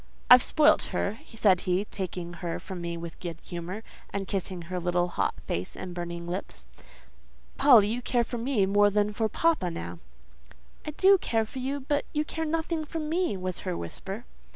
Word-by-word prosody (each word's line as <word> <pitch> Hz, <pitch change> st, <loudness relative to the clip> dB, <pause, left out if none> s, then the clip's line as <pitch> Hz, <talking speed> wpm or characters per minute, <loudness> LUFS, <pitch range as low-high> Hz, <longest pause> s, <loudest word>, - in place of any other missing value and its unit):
"I've -, -, +11 dB
spoilt -, -, +4 dB
her," 145 Hz, -, -1 dB
said 205 Hz, -5 st, +3 dB
he, 185 Hz, +2 st, 0 dB
taking 180 Hz, -3 st, -5 dB
her 170 Hz, -2 st, -2 dB
from 185 Hz, -2 st, -7 dB
me 170 Hz, 0 st, -3 dB
with 165 Hz, -1 st, -8 dB
good 170 Hz, -3 st, -5 dB
humour, 180 Hz, +5 st, -6 dB, 0.3 s
and 195 Hz, -1 st, -3 dB
kissing 185 Hz, -2 st, -3 dB
her 180 Hz, +2 st, -4 dB
little 175 Hz, 0 st, +1 dB
hot -, -, 0 dB
face 90 Hz, +2 st, -3 dB
and 185 Hz, -1 st, -6 dB
burning 170 Hz, -1 st, -5 dB
lips. 175 Hz, -, -5 dB, 0.9 s
"Polly, 230 Hz, -8 st, +7 dB
you 240 Hz, +3 st, -2 dB
care 240 Hz, 0 st, +1 dB
for 235 Hz, +1 st, -5 dB
me 235 Hz, -4 st, +2 dB
more 205 Hz, +1 st, +4 dB
than 210 Hz, +1 st, +1 dB
for 220 Hz, +1 st, 0 dB
papa, 320 Hz, -, +2 dB
now—" 85 Hz, -, -6 dB, 0.9 s
"I -, -, 0 dB
do 380 Hz, +6 st, +5 dB
care 225 Hz, -7 st, 0 dB
for 260 Hz, -, -8 dB
you, 275 Hz, +2 st, -2 dB
but 290 Hz, +2 st, 0 dB
you 300 Hz, 0 st, 0 dB
care 320 Hz, +1 st, -3 dB
nothing 320 Hz, 0 st, -1 dB
for 315 Hz, +2 st, -6 dB
me," 320 Hz, -, 0 dB
was 185 Hz, -1 st, -3 dB
her 185 Hz, -2 st, -3 dB
whisper. 195 Hz, -, -6 dB
200 Hz, 185 wpm, -28 LUFS, 175-255 Hz, 0.9 s, I've